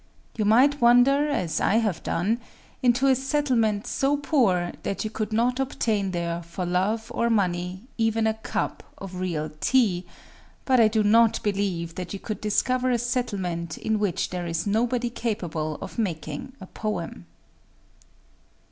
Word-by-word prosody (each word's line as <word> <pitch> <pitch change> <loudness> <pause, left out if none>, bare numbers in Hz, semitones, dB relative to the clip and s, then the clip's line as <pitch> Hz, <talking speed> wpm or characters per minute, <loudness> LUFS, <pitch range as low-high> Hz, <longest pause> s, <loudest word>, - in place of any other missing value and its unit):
You 215 - 0
might 260 +7 +4
wander,—as 245 - +4
I - - +2
have 215 -7 +1
done,—into 240 +5 -1
a 270 - +6
settlement 255 -6 +1
so 280 +2 +1
poor 235 - +2
that 200 - -3
you 215 - -4
could 215 -1 -3
not 240 +4 +1
obtain 220 -7 0
there, 170 -1 -2
for 170 +2 -5
love 195 +6 0
or 235 - +1
money, 180 -3 0 0.2
even 225 0 +2
a 220 - +2
cup 220 - -3 0.2
of 190 -2 -8
real 160 -4 -2
tea; 200 -8 +2 0.6
but 260 -2 +4
I 225 - +7
do 215 0 +1
not 225 +2 +4
believe 190 -5 -1
that 180 +1 -6
you 200 - -5
could 215 +1 -5
discover 255 +4 +1
a 245 - +2
settlement 195 -9 -2
in 220 -1 -1
which 195 -3 -1
there 180 -1 -3
is 165 0 -2
nobody 235 +3 0
capable 175 -10 -3
of 195 - -7
making 165 - -3
a 190 - -9
poem. 180 - -5
215 Hz, 150 wpm, -25 LUFS, 180-240 Hz, 0.6 s, I